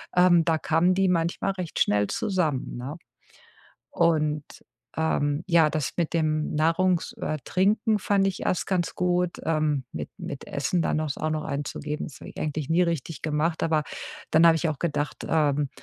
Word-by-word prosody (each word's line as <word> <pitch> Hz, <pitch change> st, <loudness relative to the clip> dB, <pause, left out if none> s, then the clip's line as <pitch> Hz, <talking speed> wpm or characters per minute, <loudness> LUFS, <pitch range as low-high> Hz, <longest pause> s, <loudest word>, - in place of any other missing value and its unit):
ähm, 180 Hz, -2 st, +6 dB
da 160 Hz, -1 st, +2 dB
kamen 165 Hz, +4 st, +2 dB
die 195 Hz, 0 st, +3 dB
manchmal 175 Hz, +2 st, 0 dB
recht 185 Hz, -4 st, -5 dB
schnell 105 Hz, 0 st, +3 dB
zusammen, 180 Hz, -, -1 dB
ne? 135 Hz, +6 st, -6 dB, 0.9 s
Und, 155 Hz, -3 st, +1 dB, 0.5 s
ähm, 150 Hz, -1 st, 0 dB
ja, 165 Hz, -4 st, +4 dB
das 150 Hz, -3 st, -2 dB
mit 170 Hz, -2 st, -1 dB
dem 155 Hz, -2 st, 0 dB
Nahrungs 165 Hz, +3 st, +2 dB
äh, 155 Hz, -, -3 dB
Trinken 210 Hz, +3 st, +2 dB
fand 195 Hz, 0 st, +2 dB
ich 195 Hz, -, -2 dB
erst 180 Hz, -, 0 dB
ganz 180 Hz, -3 st, -1 dB
gut, 180 Hz, -1 st, +1 dB
ähm, 155 Hz, -4 st, 0 dB
mit 75 Hz, -2 st, -5 dB
mit -, -, -7 dB
Essen 175 Hz, -2 st, 0 dB
dann 155 Hz, -, 0 dB
auch 155 Hz, -, -1 dB
s 140 Hz, -, -4 dB
auch 155 Hz, -, -2 dB
noch 155 Hz, 0 st, -2 dB
einzugeben. 150 Hz, +1 st, -4 dB
Das 135 Hz, -, -11 dB
habe -, -, -9 dB
ich -, -, -14 dB
eigentlich 150 Hz, -2 st, -3 dB
nie 165 Hz, +2 st, +3 dB
richtig 165 Hz, -2 st, -2 dB
gemacht, 155 Hz, +2 st, 0 dB
aber 155 Hz, -2 st, +1 dB, 0.5 s
dann 160 Hz, +2 st, +6 dB
habe 165 Hz, -1 st, +6 dB
ich 165 Hz, +1 st, 0 dB
auch 155 Hz, -3 st, -3 dB
gedacht: 150 Hz, -3 st, -2 dB
„Ähm, 150 Hz, -2 st, +2 dB
160 Hz, 180 wpm, -26 LUFS, 150-175 Hz, 0.9 s, ähm